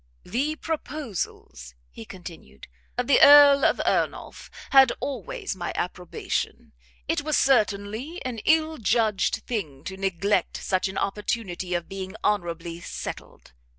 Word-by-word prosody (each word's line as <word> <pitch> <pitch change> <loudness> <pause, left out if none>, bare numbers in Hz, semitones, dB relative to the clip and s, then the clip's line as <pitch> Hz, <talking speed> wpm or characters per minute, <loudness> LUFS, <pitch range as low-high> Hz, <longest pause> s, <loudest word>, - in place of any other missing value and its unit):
"The 285 +7 -1
proposals," 255 - -5 0.2
he 110 - -10
continued, 165 - -11 0.3
"of 245 - 0
the 280 - +4
Earl 285 -1 +9
of - - +3
Ernolf - - -2 0.2
had 270 -2 +7
always 400 - -4
my 175 -2 -4
approbation; 180 0 -4 0.3
it - - 0
was 305 -1 0
certainly 225 - +1
an 245 -3 -4
ill 315 -1 +2
judged 220 -1 +1
thing 155 - -4
to 190 +2 -7
neglect 195 +1 0
such 185 0 -1
an 190 0 -6
opportunity 195 -3 -2
of 175 -1 -3
being 190 0 -7
honourably 170 -4 -1
settled. 170 - -8
205 Hz, 125 wpm, -25 LUFS, 180-275 Hz, 0.3 s, Earl